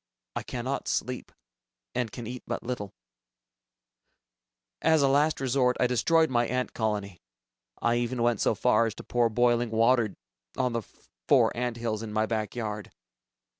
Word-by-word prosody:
I -, -, -1 dB
cannot 130 Hz, +2 st, -4 dB
sleep, 125 Hz, 0 st, -2 dB, 0.6 s
and 120 Hz, -4 st, -1 dB
can 120 Hz, -, -7 dB
eat 125 Hz, +2 st, -6 dB
but -, -, -3 dB
little. 115 Hz, -5 st, -4 dB, 1.9 s
As 160 Hz, -2 st, +4 dB
a -, -, +5 dB
last 145 Hz, +3 st, +3 dB
resort, 130 Hz, -1 st, +2 dB
I -, -, +4 dB
destroyed 160 Hz, +6 st, +3 dB
my 120 Hz, -1 st, +2 dB
ant 125 Hz, +1 st, -2 dB
colony. 105 Hz, -4 st, -2 dB, 0.6 s
I 120 Hz, 0 st, +3 dB
even 120 Hz, 0 st, -1 dB
went 120 Hz, -3 st, +2 dB
so -, -, +2 dB
far 115 Hz, +1 st, +3 dB
as 110 Hz, -, -5 dB
to -, -, -9 dB
pour 120 Hz, -1 st, +2 dB
boiling 120 Hz, +1 st, +2 dB
water 115 Hz, -1 st, +3 dB, 0.4 s
on 125 Hz, -2 st, +1 dB
the 115 Hz, -, 0 dB, 0.5 s
four -, -, +4 dB
ant 120 Hz, -1 st, -2 dB
hills 115 Hz, -2 st, -2 dB
in 110 Hz, -2 st, -6 dB
my 110 Hz, +1 st, +1 dB, 0.3 s
yard. 105 Hz, -3 st, -4 dB
120 Hz, 155 wpm, -28 LUFS, 110-125 Hz, 1.9 s, a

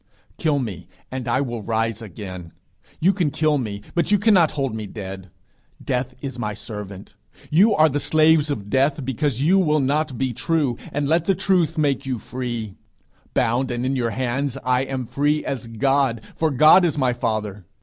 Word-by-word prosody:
Kill 155 Hz, -3 st, +1 dB
me, 100 Hz, -10 st, -4 dB, 0.2 s
and 130 Hz, -1 st, -5 dB
I 125 Hz, +3 st, +1 dB
will 120 Hz, -4 st, -3 dB
rise 115 Hz, +1 st, -1 dB
again. 90 Hz, -4 st, -8 dB, 0.5 s
You 185 Hz, +5 st, +4 dB
can 175 Hz, -5 st, 0 dB
kill 150 Hz, 0 st, +1 dB
me, 105 Hz, -4 st, -5 dB
but 170 Hz, 0 st, 0 dB
you 205 Hz, -, +5 dB
cannot 195 Hz, -6 st, +4 dB
hold 135 Hz, -5 st, -2 dB
me 110 Hz, -2 st, -5 dB
dead. 95 Hz, -2 st, -8 dB, 0.5 s
Death 125 Hz, 0 st, -2 dB
is 135 Hz, -3 st, -6 dB
my 105 Hz, -2 st, -3 dB
servant; 100 Hz, -2 st, -8 dB, 0.4 s
you 200 Hz, +8 st, +5 dB
are 155 Hz, +1 st, +5 dB
the 145 Hz, -1 st, -1 dB
slaves 155 Hz, 0 st, +3 dB
of 105 Hz, -8 st, -3 dB
Death 135 Hz, +4 st, +1 dB
because 135 Hz, 0 st, -1 dB
you 185 Hz, +6 st, +4 dB
will 155 Hz, -4 st, +2 dB
not 145 Hz, 0 st, 0 dB
be 130 Hz, -1 st, -1 dB
true, 145 Hz, -1 st, 0 dB, 0.2 s
and 145 Hz, 0 st, -1 dB
let 165 Hz, +2 st, +2 dB
the 195 Hz, -, +2 dB
truth 180 Hz, -4 st, +1 dB
make 140 Hz, -3 st, +1 dB
you 130 Hz, -2 st, -1 dB
free. 120 Hz, -3 st, -5 dB, 0.6 s
Bound, 125 Hz, +3 st, +1 dB
and 120 Hz, 0 st, -2 dB
in 135 Hz, +1 st, 0 dB
your 120 Hz, -3 st, 0 dB
hands, 130 Hz, +3 st, -2 dB
I 125 Hz, +1 st, +1 dB
am 130 Hz, -2 st, -4 dB
free 145 Hz, +5 st, 0 dB
as 125 Hz, -4 st, -4 dB
God, 130 Hz, 0 st, +1 dB
for 160 Hz, -, +1 dB
God 155 Hz, +6 st, +6 dB
is 165 Hz, -4 st, +1 dB
my 130 Hz, -3 st, +2 dB
father. 105 Hz, -5 st, -3 dB
130 Hz, 185 wpm, -22 LUFS, 115-150 Hz, 0.6 s, God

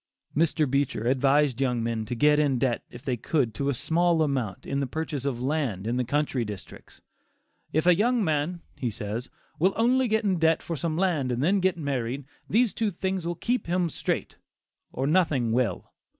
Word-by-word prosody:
Mr. 155 Hz, 0 st, +2 dB
Beecher 135 Hz, -4 st, 0 dB
advised 135 Hz, +1 st, +3 dB
young 125 Hz, -3 st, +1 dB
men 115 Hz, -1 st, -2 dB
to 120 Hz, -, -4 dB
get 150 Hz, +4 st, +4 dB
in 140 Hz, -4 st, +2 dB
debt 120 Hz, -2 st, 0 dB
if 120 Hz, -, -12 dB
they 130 Hz, -, -1 dB
could 120 Hz, 0 st, 0 dB
to 140 Hz, +5 st, -1 dB
a -, -, +1 dB
small 165 Hz, +4 st, +2 dB
amount 130 Hz, -9 st, -2 dB
in 140 Hz, -, -1 dB
the 140 Hz, -, -1 dB
purchase 150 Hz, -1 st, -4 dB
of 130 Hz, -4 st, -1 dB
land 130 Hz, -9 st, -1 dB
in 120 Hz, +2 st, -1 dB
the 125 Hz, -, +1 dB
country 140 Hz, -1 st, 0 dB
districts. 105 Hz, -3 st, -9 dB, 0.7 s
"If 155 Hz, +2 st, +1 dB
a 180 Hz, -, +7 dB
young 230 Hz, +5 st, +2 dB
man," 160 Hz, +1 st, -1 dB
he 125 Hz, -, -2 dB
says, 110 Hz, +3 st, -5 dB, 0.3 s
"will 185 Hz, +4 st, +3 dB
only 250 Hz, +3 st, +3 dB
get 220 Hz, 0 st, +1 dB
in 190 Hz, -4 st, +1 dB
debt 160 Hz, 0 st, +3 dB
for 170 Hz, -, -3 dB
some 155 Hz, +2 st, -2 dB
land 165 Hz, -9 st, +1 dB
and 120 Hz, +2 st, -1 dB
then 195 Hz, +5 st, +3 dB
get 185 Hz, -1 st, +1 dB
married, 135 Hz, -3 st, -2 dB, 0.2 s
these 230 Hz, +1 st, +3 dB
two 220 Hz, -2 st, 0 dB
things 190 Hz, -1 st, -2 dB
will 175 Hz, -, -2 dB
keep 245 Hz, +6 st, -1 dB
him 175 Hz, 0 st, +1 dB
straight, -, -, -3 dB, 0.5 s
or 130 Hz, -, -2 dB
nothing 150 Hz, -7 st, +2 dB
will." 115 Hz, -5 st, -1 dB
145 Hz, 195 wpm, -27 LUFS, 125-175 Hz, 0.7 s, a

